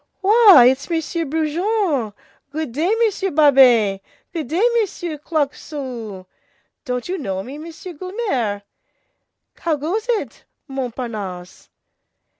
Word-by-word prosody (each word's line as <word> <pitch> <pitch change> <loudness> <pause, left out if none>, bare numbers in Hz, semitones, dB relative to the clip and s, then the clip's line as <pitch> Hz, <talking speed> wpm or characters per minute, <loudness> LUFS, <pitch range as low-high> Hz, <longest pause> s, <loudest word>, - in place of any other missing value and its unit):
"Why, 400 - +8
it's 265 +5 -5
Monsieur 330 0 -2
Brujon. 315 - 0 0.4
Good 310 -3 -4
day, 315 - 0
Monsieur 400 -2 -1
Babet. 255 - +5 0.3
Good 320 -6 -4
day, 335 - 0 0.2
Monsieur 350 -7 -3
Claquesous. 270 - -4 0.6
Don't 250 -2 -3
you 370 +1 -3
know 190 -8 -3
me, 275 +6 -8
Monsieur 335 +3 -9
Guelemer? 290 - -3 1.0
How 330 -2 0
goes 360 - -3
it, 415 - -2 0.2
Montparnasse?" 225 -9 -6
295 Hz, 105 wpm, -20 LUFS, 245-350 Hz, 1.0 s, Why